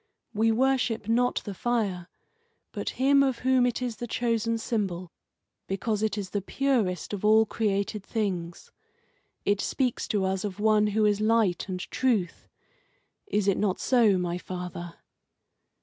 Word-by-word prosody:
We 225 +1 +2
worship 245 -2 +1
not 245 +2 +1
the 205 - -4
fire, 200 -5 -1 0.6
but - - -3
Him 275 +2 +4
of 265 -3 +1
whom 260 -1 +4
it 245 +1 -2
is 240 -3 -3
the 240 - -5
chosen 230 -1 0
symbol, 190 -7 -3 0.6
because 205 +2 -1
it 220 -1 0
is 195 -3 -4
the 205 - -1
purest 215 -6 -1
of 205 - -4
all 220 +1 +5
created 200 -1 -1
things. 185 -6 -3 0.7
It 205 0 +2
speaks 255 -3 -1
to 200 -3 0
us 190 0 -1
of 205 -1 -5
one 215 0 +3
who 215 - +4
is 210 0 +2
Light 215 -4 +2
and 185 -1 -3
Truth. 220 -9 0 0.8
Is 210 - 0
it 195 - +2
not 195 -3 0
so, 230 -7 +4
my 175 -1 -2
father?" 180 -2 -7
210 Hz, 150 wpm, -27 LUFS, 190-235 Hz, 0.8 s, all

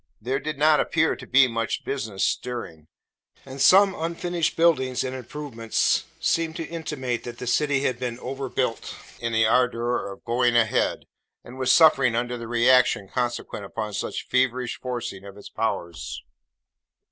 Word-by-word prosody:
There 130 +5 -2
did 155 0 -5
not 150 +1 +4
appear 160 -1 +1
to 130 - -11
be 135 0 +5
much 115 -1 -2
business 110 -8 -3
stirring; 100 -11 -3 0.6
and 135 0 -7
some 195 +7 +6
unfinished 170 +1 -2
buildings 150 -7 +2
and 130 0 -4
improvements 125 -3 -1
seemed 165 -1 0
to 165 - -4
intimate 150 -7 -4
that 120 -1 -8
the 125 - -6
city 140 +2 +1
had 130 -4 -1
been 125 -2 -3
overbuilt 130 -3 -3 0.2
in 115 -1 -2
the 110 0 +3
ardour 120 -2 +1
of 100 - -12
'going 120 0 +1
a 120 -1 +5
head,' 110 - -1 0.4
and 125 +2 -11
was 130 -1 +2
suffering 135 -7 +5
under 120 +1 -1
the 115 -1 -7
re 120 +1 +1
action 125 -6 +4
consequent 120 -3 -3
upon 105 +1 -5
such - - -4
feverish 130 -1 0
forcing 120 -6 -5
of 100 0 -11
its 105 - -11
powers. 85 - -4
125 Hz, 160 wpm, -24 LUFS, 115-135 Hz, 0.6 s, some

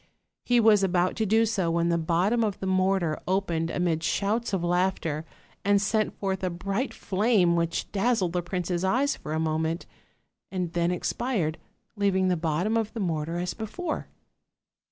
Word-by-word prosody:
He 245 -1 +3
was 215 -3 +5
about 180 -1 +1
to 220 -2 0
do 220 +3 +4
so 195 -6 0
when 170 0 +1
the 170 - +2
bottom 180 +8 +2
of 205 -3 -1
the - - -4
mortar 185 -4 +1
opened 175 -4 0
amid 170 -2 0
shouts 215 +7 0
of 190 -3 -1
laughter, 175 -3 0 0.4
and 200 0 +4
sent 215 +1 0
forth 190 -1 -2
a 185 - +1
bright 195 +8 -2
flame 195 -3 +2
which 170 -1 -1
dazzled 200 -4 +1
the 180 - +1
prince's 175 0 -2
eyes 260 +9 +2
for 150 - -8
a 160 - 0
moment, 160 +1 -1 0.7
and 180 -3 -3
then 170 0 +1
expired, 180 -2 -1 0.4
leaving 190 -2 +2
the 180 - +2
bottom 170 +7 0
of 220 -1 -1
the 230 - -5
mortar 165 -3 -1
as 180 +1 -2
before. 305 - -4
185 Hz, 170 wpm, -27 LUFS, 170-210 Hz, 0.7 s, was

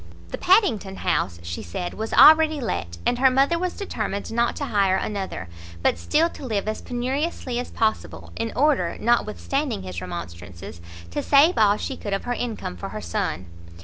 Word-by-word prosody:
The - - -4
Padington 235 - +3
house, 85 - -1
she 85 0 -5
said, 175 - -5
was 220 +1 -5
already 315 -1 +7
let, 85 - -3
and 245 - +1
her 265 0 +6
mother 275 +6 +2
was 365 0 -3
determined 215 - -4
not 235 +1 +1
to 285 - -3
hire 200 -6 +2
another, 195 - -4 0.4
but 85 - +2
still 310 - +2
to 335 - -11
live 215 -5 -2
as 215 - -3
penuriously 255 +1 -2
as 250 - -5
possible, 220 -1 -2
in 225 0 -3
order, 270 - +2
notwithstanding 240 - 0
his 90 -2 -6
remonstrances, 85 -1 -8 0.3
to - - -2
save 295 +5 +4
all 210 -1 +4
she 265 - -4
could 205 - -4
of 195 - -1
her 245 - -2
income 225 - -4
for - - -6
her - - -6
son. 85 +1 -3
220 Hz, 180 wpm, -24 LUFS, 175-275 Hz, 0.4 s, already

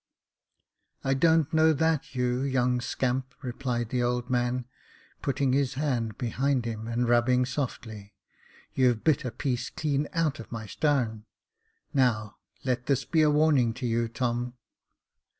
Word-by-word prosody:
" - - -47
I 135 - +2
don't 160 +2 +3
know 160 0 +5
that, 155 -2 0
you 125 0 0
young 125 -2 +1
scamp," 130 +2 -2
replied 120 -2 -2
the 125 0 0
old 125 +1 -1
man, 125 0 0 0.6
putting 135 -1 0
his 135 -1 +1
hand 125 -6 -1
behind 130 +1 0
him, 110 -1 -4
and 120 +1 0
rubbing 125 +1 +3
softly; 115 -6 -5 0.6
you've 125 -4 +2
bit 155 -5 +2
a - - -1
piece 125 0 -2
clean 145 -1 -1
out 165 -5 0
of 115 - -10
my 115 -2 -5
starn. 115 -4 0 0.7
Now, 115 -7 +1 0.3
let 125 -1 -1
this 140 -3 +1
be 160 - +2
a 155 - +5
warning 145 -6 +3
to 130 0 -5
you, 115 0 +1
Tom. 120 +1 -2
125 Hz, 150 wpm, -28 LUFS, 120-140 Hz, 0.7 s, know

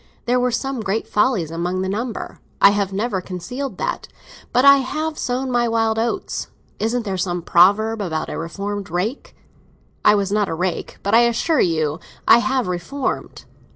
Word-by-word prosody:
There 250 +1 +2
were 250 0 +2
some 270 +1 -2
great 215 +1 -2
follies 210 -8 +1
among 175 +3 -2
the - - -2
number—I 220 -1 0
have 200 -1 -1
never 200 -1 -1
concealed 245 +10 -6
that. - - -3 0.4
But 250 +2 +3
I 280 0 +9
have 310 +4 -2
sown 255 -1 -2
my 240 -1 +2
wild 225 -1 +1
oats. 240 +12 -2 0.3
Isn't 230 +2 -1
there 195 -2 -2
some 175 -1 -2
proverb 205 +6 +4
about 160 -5 -2
a - - -5
reformed 200 +4 -4
rake? 220 - -3 0.7
I 210 - +6
was 200 -1 0
not 210 -1 +1
a 165 - -2
rake, 180 +1 -3
but 200 - -1
I 230 - +8
assure 255 +6 +1
you 155 -2 0 0.3
I 235 - +8
have 260 0 0
reformed. 180 +10 -4
215 Hz, 170 wpm, -21 LUFS, 185-250 Hz, 0.7 s, I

